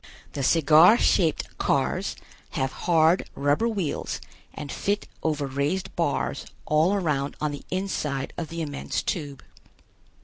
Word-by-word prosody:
The 140 - -3
cigar 160 - +6
shaped 165 -9 +1
cars - - 0 0.4
have 130 0 0
hard 165 +1 +2
rubber 145 +11 +2
wheels 195 -10 -2 0.3
and 145 - -7
fit 205 +1 -1
over 150 -3 0
raised 140 +7 -2
bars - - -1 0.2
all 160 +6 +3
around 150 -7 -1
on 150 -1 -1
the 145 - -7
inside 155 -8 -2
of 170 - -4
the 165 0 -4
immense 145 -2 -3
Tube. 145 -5 -4
155 Hz, 130 wpm, -26 LUFS, 140-180 Hz, 0.4 s, cigar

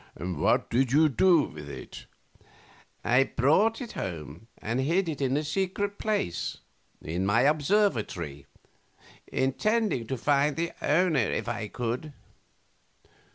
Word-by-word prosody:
Q. 90 +4 -4
What 75 - +1
did 125 +1 +2
you 155 +3 +5
do 165 +4 +4
with 75 - -8
it? - - -9 0.4
A. - - -32 0.6
I 125 +2 +5
brought 190 - +2
it 240 - -6
home 85 +2 -6
and 115 +4 -2
hid 170 +7 +1
it 150 -4 -4
in 135 0 +1
a 150 - -1
secret 195 +5 -2
place 205 - -1 0.5
in 85 +4 -2
my 100 +5 +3
observatory, 135 - +1 0.8
intending 140 - 0
to 130 - -2
find 145 +3 +2
the 170 +1 -2
owner 160 -1 +3
if 115 - -1
I 115 -2 -3
could. 125 +7 -4
135 Hz, 135 wpm, -28 LUFS, 110-170 Hz, 0.8 s, you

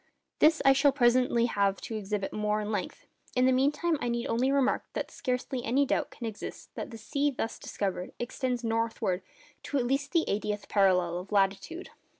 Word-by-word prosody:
This 315 +1 +5
I 270 - +8
shall 275 +1 +4
presently 245 -2 +3
have 200 -4 +1
to 225 - -5
exhibit 205 -1 -3
more 210 0 0
at 210 - -4
length; 205 -4 -4 0.3
in 250 0 +4
the 260 - +5
meantime 295 +5 +2
I 245 - -1
need 235 0 -1
only 250 +4 +1
remark 275 -2 +2
that - - -3
scarcely 250 0 -2
any 265 +5 +2
doubt 275 - 0
can 240 - -8
exist 220 -2 -7
that - - -5
the 230 - -8
sea 280 +6 0
thus 230 -4 -4
discovered 190 -3 -3
extends 245 0 -2
northwards 225 -5 -1 0.4
to 285 - -2
at 250 - +1
least 275 +3 0
the 335 -2 +3
eightieth 210 0 -2
parallel 180 -4 +3
of 185 +3 -10
latitude. 200 - 0
235 Hz, 185 wpm, -29 LUFS, 205-270 Hz, 0.4 s, I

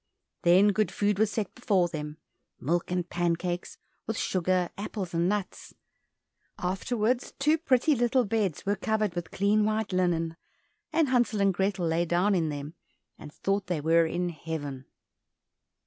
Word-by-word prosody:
Then 185 +4 +6
good 210 +1 +1
food 205 -1 0
was 220 -1 +3
set 210 -2 -3
before 200 -8 +2
them, 150 -2 -6 0.4
milk 170 +6 -1
and 180 -1 -1
pancakes, 175 0 -2 0.3
with 225 0 -2
sugar, 185 -1 0
apples, 200 -3 -5
and 170 +2 +2
nuts. 205 -2 -4 0.8
Afterwards 220 +6 -1
two 305 +3 +2
pretty 270 -1 +3
little 245 +1 +2
beds 200 -6 -1
were 200 +1 +1
covered 215 -1 0
with 175 0 -4
clean 205 +2 +2
white 215 -2 -1
linen, 165 -3 0 0.5
and 320 -3 +2
Hansel 240 -4 +2
and 195 -1 +3
Grethel 190 -1 0
lay 165 +1 +1
down 175 +5 +2
in 165 -4 +1
them, 145 +1 -5 0.5
and 150 - -10
thought 195 +4 -1
they 175 -3 -1
were 165 +2 +3
in 175 +2 -1
heaven. 150 -5 -6
185 Hz, 150 wpm, -28 LUFS, 170-215 Hz, 0.8 s, Then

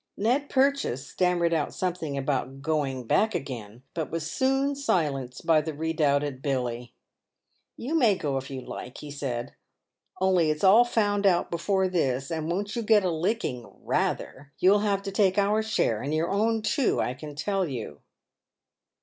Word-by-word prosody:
Ned 255 +8 +1
Purchase 265 - +1
stammered 175 -1 +1
out 155 -3 -1
something 170 -6 -2
about 135 0 -2
going 145 -5 -1
back 215 - +2
again, 120 -7 -6
but 160 -3 -3
was 165 -1 -3
soon 270 - +1
"silenced 145 - -1
by 160 -2 +4
the 155 0 -5
redoubted 145 -3 0
Billy. 125 -4 -3 0.8
"You 265 +7 -4
may 240 -11 +4
go 145 -6 -2
if 135 0 -5
you 135 -2 -5
like," 125 0 -8
he 150 - -8
said, 125 -4 -4 0.3
" - - -29
only 185 -4 +3
it's 155 +3 -2
all 200 +5 +7
found 205 -4 +1
out 175 -2 +2
before 190 +3 +1
this; 135 -7 -1
and 160 -1 -2
won't 200 +4 -2
you 235 - -1
get 215 -2 +4
a 180 - +1
licking 165 - -2
— - - -27
rather! 140 +1 -2
You'll 195 +3 +5
have 200 -1 0
to 195 - -4
take 195 -1 +2
our 205 +2 +3
share 120 - 0
and 140 - -3
your 160 +2 0
own 220 +2 +1
too, 275 +2 +1
I 125 - 0
can 150 +2 -9
tell 190 +5 -1
you." 110 - -6
165 Hz, 175 wpm, -27 LUFS, 140-205 Hz, 0.8 s, all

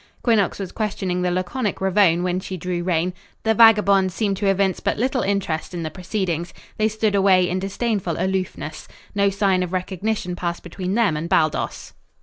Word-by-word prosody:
Quinnox 220 -6 +2
was 190 -2 -5
questioning 195 -4 -2
the 180 - +1
laconic 185 +6 -2
Ravone 190 -3 +3
when 180 0 0
she 185 0 -6
drew 180 +1 -3
rein. 175 0 0 0.3
The 220 - +3
vagabonds 200 -4 +5
seemed 205 -3 0
to 200 - -1
evince 195 -1 +2
but - - -1
little 255 +2 0
interest 185 -4 -2
in 170 - -3
the 155 - -4
proceedings. 180 -3 -3 0.2
They 215 - +2
stood 220 -1 0
away 190 -2 +4
in 180 +1 -1
disdainful 195 -2 -2
aloofness. 190 0 -3 0.3
No 200 -1 +3
sign 195 -2 +1
of 180 0 -3
recognition 185 0 -2
passed 175 -1 -4
between 185 +2 -4
them 220 -9 +2
and 160 +3 -4
Baldos. 155 -5 0
190 Hz, 175 wpm, -22 LUFS, 180-205 Hz, 0.3 s, vagabonds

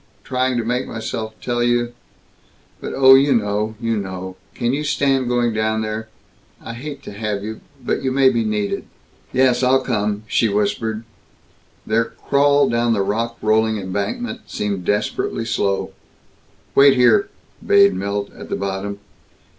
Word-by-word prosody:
Trying 130 -1 0
to 120 - 0
make 125 +2 -1
myself 110 0 -5
tell 120 -1 -1
you 120 0 +1 0.9
but - - -6
oh, 130 0 +8
you 135 0 +5
know, 105 0 -1
you 115 -2 -1
know! 95 -2 -5 0.2
Can 120 0 0
you 145 +2 -1
stand 135 -3 +1
going 120 -1 +1
down 110 0 0
there? 110 0 -4 0.5
I 115 - -8
hate 140 +3 -7
to - - -8
have 105 -1 -3
you, 110 +1 -6 0.2
but 125 - -2
you 130 - -1
may 135 0 +5
be 115 -3 0
needed." 105 -2 -2 0.5
"Yes. 130 -1 +3
I'll 130 +1 +3
come," 105 -4 -1
she 115 0 +1
whispered. 110 +2 -1 0.8
Their 115 +1 +2
crawl 140 +3 +2
down 120 0 +1
the 100 -3 +1
rock 115 +4 -2
rolling 110 0 +2
embankment 100 - -4
seemed 100 -3 -3
desperately 105 +3 -1
slow. 100 -3 -1 0.8
"Wait 140 -1 +7
here," 125 - +4 0.3
bade 200 -2 +5
Milt, 100 +1 -3
at - - -11
the - - -1
bottom. 100 +1 -3
115 Hz, 155 wpm, -20 LUFS, 105-130 Hz, 0.9 s, oh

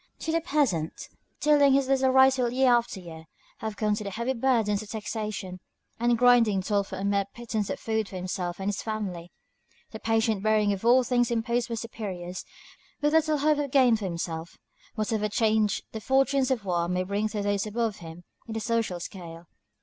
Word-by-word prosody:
To 320 - -2
the 330 +1 +1
peasant, 270 - -1 0.3
tilling 290 -2 +5
his 275 -1 +2
little 265 -1 +3
rice 265 0 +5
field 245 -2 0
year 260 -1 +4
after 235 -4 0
year, 160 -3 -10 0.3
have 220 -1 -5
come 210 0 +1
the 210 -1 -3
heavy 235 +6 -2
burdens 230 -5 +1
of 215 - -11
taxation; 210 -4 -5 0.4
the 240 0 +3
grinding 230 -5 +4
toil 205 +1 +1
for 195 - -8
a 190 - -4
mere 200 0 +1
pittance 220 -4 -3
of - - -3
food 220 -2 -2
for - - -9
himself 180 -1 -4
and 195 - -3
his 200 -2 -3
family; 190 -6 -5 0.6
the 220 - -7
patient 225 -2 +1
bearing 215 -1 +2
of 195 - -6
all 250 +2 +5
things 245 -1 +1
imposed 235 +1 0
by - - -3
his 225 - -3
superiors, 185 -6 -6 0.6
with 295 +1 +1
little 315 -1 +3
hope 295 +1 +2
of 285 -1 -2
gain 255 -3 +5
for 215 -2 -4
himself, 170 -2 -5 0.4
whatever 215 -1 -1
change 215 -1 +1
the 220 - -6
fortunes 270 +1 +2
of 240 -6 -1
war 175 -2 0
may 180 0 0
bring 200 +3 -1
to 210 -2 -3
those 205 0 0
above 225 0 -1
him 165 +1 -10 0.2
in 225 - -5
the - - -1
social 225 -5 -1
scale. 170 -2 -9
220 Hz, 195 wpm, -27 LUFS, 195-245 Hz, 0.6 s, tilling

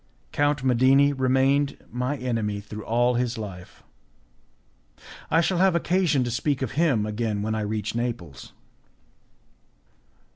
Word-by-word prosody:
Count 145 -2 +1
Medini 135 +3 +4
remained 135 +2 +1
my 125 +5 -2
enemy 115 -5 -2
through 105 +1 -8
all 120 +2 +2
his 120 -1 -1
life. 95 -5 -9 1.5
I 165 - +4
shall 175 +1 0
have 190 -1 +4
occasion 170 -5 +1
to 120 - -3
speak 135 +4 -1
of 130 - -3
him 140 -10 +1
again 105 -1 -2
when 110 +1 -1
I 110 - -1
reach 105 0 -3
Naples. 115 - -5
125 Hz, 125 wpm, -25 LUFS, 110-140 Hz, 1.5 s, Medini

